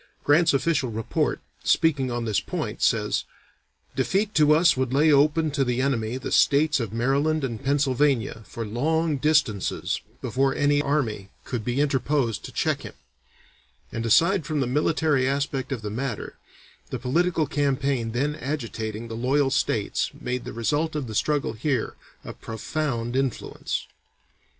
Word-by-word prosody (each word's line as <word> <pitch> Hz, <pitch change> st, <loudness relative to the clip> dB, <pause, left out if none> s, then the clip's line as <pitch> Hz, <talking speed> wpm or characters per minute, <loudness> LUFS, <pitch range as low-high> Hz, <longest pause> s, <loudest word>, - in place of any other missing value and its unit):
Grant's 160 Hz, +3 st, +4 dB
official 140 Hz, -2 st, +1 dB
report, 115 Hz, 0 st, -1 dB, 0.2 s
speaking 140 Hz, -5 st, +2 dB
on 120 Hz, -1 st, -2 dB
this 110 Hz, -3 st, +1 dB
point, -, -, -4 dB
says: -, -, +1 dB, 0.7 s
"Defeat 205 Hz, +2 st, 0 dB
to 150 Hz, -3 st, +4 dB
us 165 Hz, +3 st, +5 dB
would 130 Hz, -1 st, -1 dB
lay 150 Hz, +4 st, +4 dB
open 150 Hz, +2 st, +3 dB
to 140 Hz, -1 st, +1 dB
the 125 Hz, -1 st, -1 dB
enemy 125 Hz, -3 st, 0 dB
the 130 Hz, -, -5 dB
states 150 Hz, +1 st, +4 dB
of 115 Hz, -5 st, -3 dB
Maryland 140 Hz, +6 st, +1 dB
and 120 Hz, -2 st, -4 dB
Pennsylvania 135 Hz, -4 st, +1 dB
for 115 Hz, -, -5 dB
long 155 Hz, +8 st, 0 dB
distances 135 Hz, -9 st, +1 dB, 0.2 s
before 135 Hz, +1 st, 0 dB
another 145 Hz, 0 st, +2 dB
army 115 Hz, -10 st, -1 dB, 0.2 s
could 120 Hz, -4 st, -3 dB
be 125 Hz, +4 st, -1 dB
interposed 140 Hz, -4 st, 0 dB
to -, -, -8 dB
check -, -, 0 dB
him," -, -, -9 dB, 1.0 s
and 115 Hz, -, -3 dB
aside 165 Hz, -, +4 dB
from 155 Hz, -1 st, -2 dB
the 135 Hz, -, +1 dB
military 145 Hz, 0 st, +1 dB
aspect 140 Hz, -1 st, -2 dB
of 120 Hz, -5 st, -3 dB
the 105 Hz, -, -4 dB
matter, 120 Hz, 0 st, -4 dB, 0.5 s
the -, -, -3 dB
political 165 Hz, +4 st, +1 dB
campaign 135 Hz, -4 st, 0 dB
then 140 Hz, +6 st, 0 dB
agitating 115 Hz, -6 st, -4 dB
the 115 Hz, -, -6 dB
loyal 135 Hz, +4 st, +1 dB
states 130 Hz, -, 0 dB
made 125 Hz, 0 st, -3 dB
the -, -, -5 dB
result 145 Hz, +8 st, -1 dB
of 150 Hz, -3 st, -2 dB
the 110 Hz, -, -7 dB
struggle 145 Hz, +1 st, 0 dB
here 125 Hz, +1 st, -1 dB, 0.3 s
of -, -, -10 dB
profound 120 Hz, +1 st, -3 dB
influence. 135 Hz, -3 st, -2 dB
135 Hz, 150 wpm, -25 LUFS, 120-150 Hz, 1.0 s, us